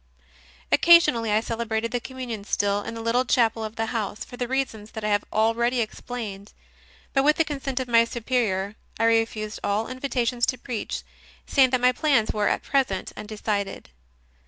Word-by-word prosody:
Occasionally 290 -10 +6
I 215 +1 +3
celebrated 230 0 -2
the 245 - 0
Com 260 +2 -10
munion 235 -5 -5
still 205 0 0
in 225 - -6
the 225 - -6
little 235 +2 +2
chapel 230 -3 +2
of 215 0 -6
the 225 - -1
house, 210 -3 -3
for - - -10
the 245 0 -3
reasons 235 -5 -3
that 220 - -6
I 210 - 0
have 205 0 +2
already 235 +3 +2
explained; 215 -3 -5 0.6
but, 270 - +4
with 300 +2 +4
the 325 - +2
consent 275 -3 -3
of 260 - -3
my 230 -1 +5
Superior, 220 -5 -1 0.2
I - - +1
refused 225 -2 +1
all 205 +2 0
invitations 250 -2 -1
to 255 - 0
preach, 245 -5 -4 0.4
saying 265 -2 +4
that 255 -1 +1
my 250 0 +5
plans 255 -4 +2
were 210 -1 +1
at - - 0
present 260 -9 0
undecided. 210 - -4
230 Hz, 180 wpm, -25 LUFS, 215-255 Hz, 0.6 s, Occasionally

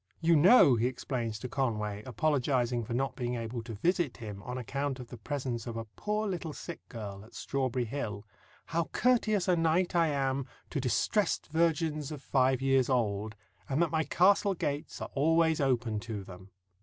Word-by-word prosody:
"You 165 0 +4
know," 165 - +7
he 115 +2 +2
explains 120 -3 -3
to 125 - -6
Conway, 105 -6 -2
apologizing 125 -2 +1
for 115 +2 -4
not 135 +2 -1
being 125 -1 -2
able 115 0 -4
to 115 -1 -7
visit 170 - 0
him 105 -3 -7
on 125 +4 -5
account 135 +2 -3
of 125 -1 -9
the 120 - -8
presence 125 -1 -4
of 115 -1 -4
a 115 - -4
"poor 210 - -2
little 175 -5 -3
sick 170 +2 -7
girl" 100 -4 -7
at 110 - -16
Strawberry 130 -2 -1
Hill, 110 -4 -4 0.4
"how 165 +1 -1
courteous 215 -5 +2
a 180 - +4
knight 165 +2 +2
I 165 -1 +4
am 135 -2 -1 0.2
to 140 - -1
distrest 170 - +1
virgins 160 -2 +1
of 145 -3 -7
five 130 -1 +2
years 135 -1 +3
old, 110 -4 0 0.3
and 135 +2 0
that 170 - -1
my 160 -1 +1
castle 195 +4 +3
gates 145 -1 -3
are - - -6
always 160 +2 +3
open 120 -5 +1
to 110 -2 -5
them." 95 0 -12
135 Hz, 180 wpm, -30 LUFS, 115-160 Hz, 0.4 s, know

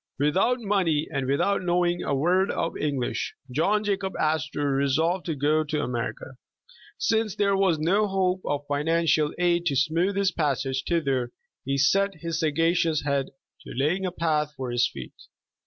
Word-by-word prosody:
Without 170 - +2
money, 185 -8 +1
and 135 -2 -1
without 140 +9 +1
knowing 175 -1 +1
a 140 - -1
word 180 +7 +2
of 165 - -2
English, 140 -5 -2 0.2
John 200 +10 +1
Jacob 195 -2 -2
Astor 145 -2 0
resolved 160 +7 +1
to 160 - -1
go 150 +3 +2
to 150 0 -2
America. 125 +1 -4 0.6
Since 220 -3 0
there 200 -2 +2
was 190 -4 +2
no 190 +7 +2
hope 190 -1 0
of 145 0 -2
financial 155 +1 +1
aid 175 -1 +1
to 140 - +1
smooth 165 +7 +1
his 200 -1 +2
passage 135 -4 -1
thither, 135 -8 0 0.4
he 135 +1 0
set 195 +8 +2
his 165 0 -4
sagacious 165 0 +1
head 140 -2 0 0.3
to - - -10
laying 155 +9 0
a - - -3
path 150 -3 -1
for 130 -2 -4
his 120 0 +2
feet. - - -9
160 Hz, 160 wpm, -25 LUFS, 145-185 Hz, 0.6 s, Without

